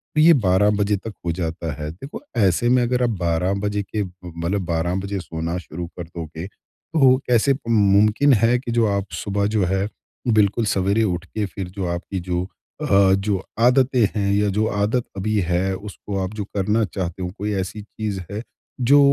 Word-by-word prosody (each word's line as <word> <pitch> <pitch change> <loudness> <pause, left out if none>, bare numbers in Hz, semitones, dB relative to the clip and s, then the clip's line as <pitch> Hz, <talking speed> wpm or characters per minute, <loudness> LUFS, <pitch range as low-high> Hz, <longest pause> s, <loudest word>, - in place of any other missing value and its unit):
तो 155 - +4
ये 165 +2 +8
12 100 - +3
बजे 105 0 +1
तक 110 +3 -7
हो 85 - +1
जाता 85 -1 -3
है 75 - -3
देखो 135 - -9 0.2
ऐसे 100 +2 +3
में 125 0 +4
अगर 125 +1 +1
आप 120 - +2
12 85 +2 +1
बजे 105 0 -1
के 105 +2 -2
मतलब 90 +1 -4
12 85 +1 0
बजे 100 +1 -3
सोना 85 0 -4
शुरू 85 -1 -6
कर - - -2
दोगे 80 0 -7
तो 135 +5 +1
कैसे 125 +3 +4
मुमकिन 105 +5 +4
है 115 +2 +4
कि 120 -1 -5
जो 115 -1 +3
आप 100 -1 0 0.2
सुबह 100 0 0
जो 105 - +3
है 95 +2 0 0.4
बिल्कुल 110 0 +3
सवेरे 100 +3 +2
उठ 90 -3 -1
के 105 +3 -3
फिर 95 -1 -6
जो 95 - -1
आपकी 90 +2 -4
जो 90 0 -2 0.4
अ, 100 -1 +4
जो 95 0 0 0.2
आदतें 125 0 +4
हैं 100 -1 +1
या 105 +1 +2
जो 105 +3 +1
आदत 105 +4 0
अभी 105 +2 0
है 90 +2 +1
उसको 100 0 -6
आप 95 +3 -4
जो 105 - -3
करना 105 +3 +2
चाहते 90 0 -4
हो 90 - -2
कोई 105 +1 -2
ऐसी 95 +2 -3
चीज़ 105 -1 -5
है 105 +3 -4 0.5
जो 145 - +8
100 Hz, 190 wpm, -22 LUFS, 90-110 Hz, 0.5 s, ये